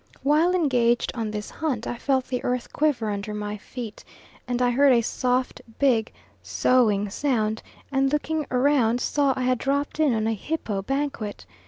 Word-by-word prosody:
While 310 +6 +3
engaged 245 -8 +2
on 225 -3 -3
this 210 0 -5
hunt 265 -8 -2
I - - -3
felt 265 -2 +1
the 250 -1 -3
earth 250 -1 -2
quiver 265 -8 +1
under 205 +1 -4
my 210 0 -4
feet, 225 +1 -8 0.4
and 245 -1 -1
heard 250 +3 +4
a 235 - +4
soft 250 +2 -1 0.2
big 240 -5 +2 0.3
soughing 215 -5 +2
sound, 220 -5 0 0.3
and 270 0 +2
looking 300 0 -1
round 250 -3 +2
saw 285 +1 +1
I 255 - -1
had 255 -1 +1
dropped 280 +2 -1
in 295 -6 +3
on 220 -1 0
a 225 - +1
hippo 215 -4 -3
banquet. 270 -3 -3
250 Hz, 165 wpm, -25 LUFS, 220-280 Hz, 0.4 s, heard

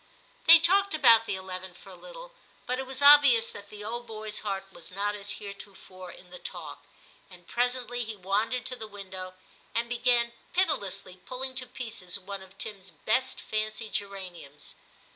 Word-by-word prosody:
They 335 +1 +12
talked 385 +3 +3
about 230 -6 +7
the - - -1
eleven 185 -1 -7
for - - -14
a - - -11
little, - - -11 0.3
but 255 +1 -1
it 265 - -4
was 265 +1 -2
obvious 280 -6 +8
that 205 0 -11
the 210 -1 -9
old 240 +3 -5
boy's 215 -1 -3
heart 195 -2 -3
was 170 - -11
not 200 +2 -2
as 205 0 -3
heretofore 195 -2 -10
in 180 0 -16
the 180 - -9
talk, - - -8 0.5
and 180 -2 -15
presently 245 +1 -1
he 220 -1 -6
wandered 210 +6 -1
to 255 - -3
the 220 -3 -7
window, 190 -3 -8 0.4
and 235 +1 +1
began 240 0 +2 0.2
piti 370 -2 +3
lessly 190 -5 -6
pulling 260 +1 -2
to 255 0 -1
pieces 225 -7 -4
one 200 0 -7
of 190 0 -15
Tim's 195 -3 -5
best 255 +7 0
fancy 215 0 -3
geraniums. 185 -9 -6
215 Hz, 175 wpm, -28 LUFS, 195-250 Hz, 0.5 s, They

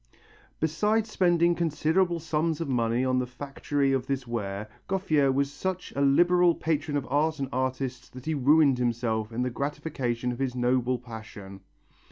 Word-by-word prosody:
Besides 210 +8 +1
spending 175 -2 +3
considerable 170 +2 +1
sums 160 0 -1
of 165 - -3
money 120 -1 +1
on 130 0 +2
the 125 - -2
factory 135 +2 -2
of 130 -1 -1
this 135 -2 -2
ware, 105 -3 -4 0.2
Gouffier 155 -8 +2
was 140 +1 0
such 185 +1 -4
a 140 - 0
liberal 175 +5 +4
patron 150 -2 -1
of 140 - -3
art 155 +3 +2
and 135 -2 -2
artists 130 0 -2
that 130 0 -11
he 160 - 0
ruined 140 -1 +4
himself 115 -2 -1
in 120 +2 -1
the 125 - -1
gratification 130 -3 -2
of 120 - -6
his 130 -2 -1
noble 125 0 +1
passion. 110 -5 -10
135 Hz, 165 wpm, -27 LUFS, 125-160 Hz, 0.2 s, liberal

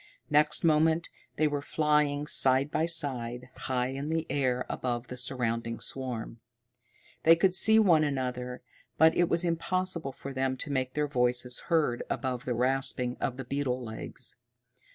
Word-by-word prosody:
Next 150 0 +4
moment 160 +1 +2 0.3
they 155 - +2
were 145 -1 -2
flying 150 -1 +1
side 135 0 +2
by 160 +1 0
side, 125 -7 -2
high 125 -1 -2
in 135 +3 -5
the 160 0 -1
air 125 -3 0
above 120 -1 -3
the 125 - -6
surrounding 115 -2 -2
swarm. 125 -3 -4 0.8
They 165 +1 +6
could 185 +2 +2
see 220 +4 +7
one 175 -8 +5
another, 125 -3 -3 0.3
but 160 +1 +5
it 175 -1 +2
was 170 +1 +1
impossible 170 -2 -1
for 135 +1 -8
them 130 0 -1
to 145 - -5
make 130 -2 -2
their 150 0 0
voices 125 -2 0
heard 155 -8 +1
above 130 -2 -3
the 125 - -1
rasping 125 0 +1
of 125 - -3
the 135 - -6
beetles' 130 -2 -2
legs. 110 0 -6
135 Hz, 155 wpm, -29 LUFS, 125-155 Hz, 0.8 s, see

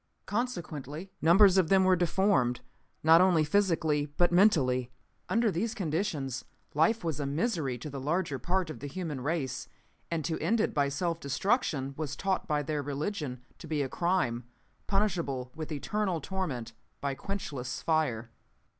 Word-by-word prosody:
Consequently 175 - -4
numbers 190 +3 +6
of 170 -4 +2
them 190 -1 +5
were 185 0 +5
deformed, 175 -8 +2 0.4
not 165 +2 +7
only 180 -4 +4
physically, 160 -4 +2
but 175 0 +4
mentally. 135 - +4 0.4
Under 230 -1 +3
these 220 +6 -2
conditions 155 - -2 0.3
life 170 +10 +3
was 160 -3 -2
a 140 - -1
misery 150 - -1
to 125 - -7
the 140 -2 -6
larger 145 0 -1
part 175 +5 0
of 120 - -9
the 145 - -5
human 150 -3 -4
race, 140 -2 -2 0.4
and 165 -3 -2
to 160 - -1
end 215 +9 +1
it 215 - +1
by 140 -1 +2
self 165 +4 -1
destruction 140 - 0
was 150 -2 -3
taught 190 +1 -1
by 150 -1 +1
their 150 +1 -2
religion 145 -2 -3 0.2
to 165 - -9
be 150 -2 0
a 135 - -3
crime 170 -10 0 0.4
punishable 170 -11 0
with 160 0 -6
eternal 185 +4 -1
torment 135 -10 -4 0.3
by 140 -1 -1
quenchless 140 -8 -5
fire. 125 -8 0
160 Hz, 155 wpm, -30 LUFS, 140-190 Hz, 0.4 s, not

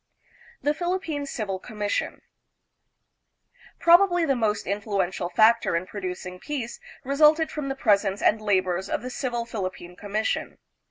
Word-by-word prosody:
The 295 - +2
Philippine 330 -4 -2
Civil 205 -7 -3
Commission. 210 -1 -3 1.6
Probably 350 0 +5
the 275 -3 +2
most 215 -4 0
influential 195 -2 -2
factor 220 +1 +4
in 170 +2 -1
producing 180 -2 -6
peace 255 -3 -5 0.2
resulted 300 +4 +4
from 295 -3 -4
the 270 - -2
presence 200 -5 +2
and 215 +1 +2
labors 190 -3 0
of - - -2
the 255 - -5
Civil 240 -3 -2
Philippine 185 -5 -5
Commission. 210 +3 -2
220 Hz, 125 wpm, -25 LUFS, 195-280 Hz, 1.6 s, Probably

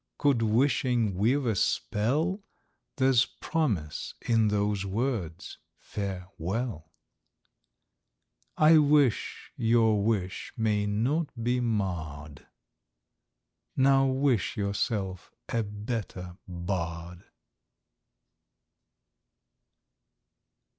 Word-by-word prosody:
—could 140 -5 +2
wishing 120 -1 +2
weave 120 +9 +1
a 115 -3 +1
spell, 140 - 0 0.6
There's 130 -2 +4
promise 110 - -2
in 115 -2 +2
those 105 -1 0
words 100 -5 -3 0.2
"Fare 95 -3 -5
well!" 95 -2 -3 1.7
I 155 +1 +7
wish 145 -5 +2
your 115 -2 +3
wish 100 -4 -2
may 105 -2 +1
not 135 +10 0
be 125 +1 +1
marr'd;— 80 - -3 1.3
Now 135 0 +5
wish 130 - +1
yourself 100 -2 -2 0.2
a 115 - 0
better 105 -4 -5
Bard! 85 -1 -4
110 Hz, 75 wpm, -28 LUFS, 95-130 Hz, 1.7 s, I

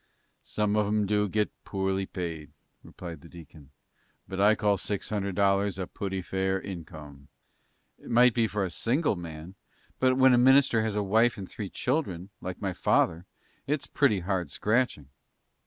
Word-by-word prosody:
"Some 105 -1 -1
of 105 -1 +2
'em 105 0 +1
do 105 0 +1
get 105 +1 0
poorly 95 -1 -2
paid," 80 -4 -5 0.3
replied 85 -4 -9
the 85 - -14
deacon; 80 -4 -14 0.6
"but 95 0 -3
I 105 +2 +6
call 105 -1 +1
six 100 +2 -3
hundred 100 -3 -2
dollars 100 0 +2
a 95 - -3
pooty 95 0 -4
fair 95 +1 -1
income." 80 -7 -9 0.7
"It - - -13
might 120 +1 +5
be 115 -1 +2
for 105 -2 -1
a 90 - -5
single 130 - +1
man; 85 0 -8 0.5
but 130 0 +3
when 130 -1 +6
a 120 - +5
minister 130 -2 +5
has 110 -2 -2
a 105 - 0
wife 110 +4 +3
and 95 -2 -7
three 105 -3 -6
children, 100 - -2
like 95 0 -6
my 95 -2 -2
father, 85 0 +1 0.4
it's 145 0 -1
pretty 115 -10 +2
hard 90 -3 -2
scratching." 105 - 0
100 Hz, 170 wpm, -28 LUFS, 90-110 Hz, 0.7 s, I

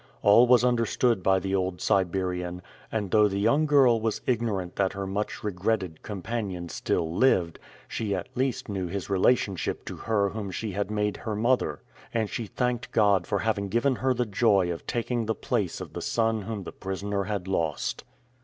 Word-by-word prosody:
All 110 +5 +7
was 125 0 +6
understood 120 -2 +2
by 95 +1 +3
the 95 +1 -2
old 95 -2 0
Siberian, 90 -1 0 0.3
and 105 -4 -2
though 105 -1 +5
the 100 -1 -2
young 145 +9 +3
girl 130 -6 +5
was 110 -1 -1
ignorant 110 -7 -1
that 95 -1 +1
her 100 0 -4
much 100 +2 -3
regretted 95 -3 -1
companion 95 -3 -4
still 80 0 -1
lived, 90 -9 +2 0.3
she 105 -3 -2
at 90 - -4
least 130 -1 -1
knew 95 -3 -3
his 100 +2 -5
relationship 95 -1 +1
to - - -6
her 105 -3 +1
whom 105 -1 -5
she 105 +3 -4
had 100 +1 -2
made 105 -1 -1
her 110 -3 -4
mother; 120 +4 +1 0.3
and 110 -2 0
she 115 - -3
thanked 125 +1 -2
God 100 -5 +3
for 100 - 0
having 100 -1 -1
given 120 +4 +1
her 130 0 +1
the 120 0 0
joy 100 -4 +2
of 85 - -7
taking 120 -1 -1
the 110 - 0
place - - -2
of - - -8
the - - -5
son 115 -1 0
whom 105 -1 -5
the - - -7
prisoner 100 +1 -3
had 100 -2 -3
lost. 80 -7 -1
105 Hz, 185 wpm, -27 LUFS, 95-115 Hz, 0.3 s, All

